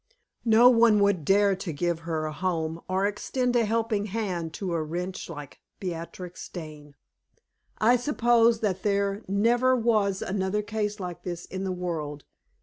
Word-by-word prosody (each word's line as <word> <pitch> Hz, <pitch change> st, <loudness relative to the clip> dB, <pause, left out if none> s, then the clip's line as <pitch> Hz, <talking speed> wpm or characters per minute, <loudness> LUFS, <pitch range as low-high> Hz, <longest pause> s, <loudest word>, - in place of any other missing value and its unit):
No 230 Hz, +2 st, +7 dB
one 230 Hz, -3 st, +6 dB
would 200 Hz, -5 st, +2 dB
dare 200 Hz, +4 st, +4 dB
to 185 Hz, -2 st, -4 dB
give 170 Hz, +2 st, -1 dB
her 165 Hz, -2 st, -3 dB
a 155 Hz, -, -4 dB
home 165 Hz, -2 st, -2 dB
or 190 Hz, +1 st, +1 dB
extend 245 Hz, +4 st, -1 dB
a 235 Hz, -2 st, +4 dB
helping 220 Hz, -1 st, 0 dB
hand 190 Hz, -6 st, -3 dB
to 185 Hz, -4 st, -3 dB
a 165 Hz, -, 0 dB
wretch 175 Hz, +5 st, -4 dB
like 145 Hz, -4 st, -9 dB, 0.2 s
Beatrix 175 Hz, 0 st, -6 dB
Dane. 150 Hz, -4 st, -9 dB, 0.8 s
I 240 Hz, +3 st, +4 dB
suppose 235 Hz, -3 st, +3 dB
that 190 Hz, -4 st, -1 dB
there 200 Hz, 0 st, 0 dB
never 235 Hz, +6 st, +3 dB
was 215 Hz, -5 st, +1 dB
another 195 Hz, +2 st, -1 dB
case 210 Hz, 0 st, -3 dB
like 180 Hz, -2 st, -6 dB
this 175 Hz, -2 st, -5 dB
in 190 Hz, +1 st, -5 dB
the 190 Hz, -, -1 dB
world. 160 Hz, -5 st, -4 dB
195 Hz, 155 wpm, -27 LUFS, 170-220 Hz, 0.8 s, No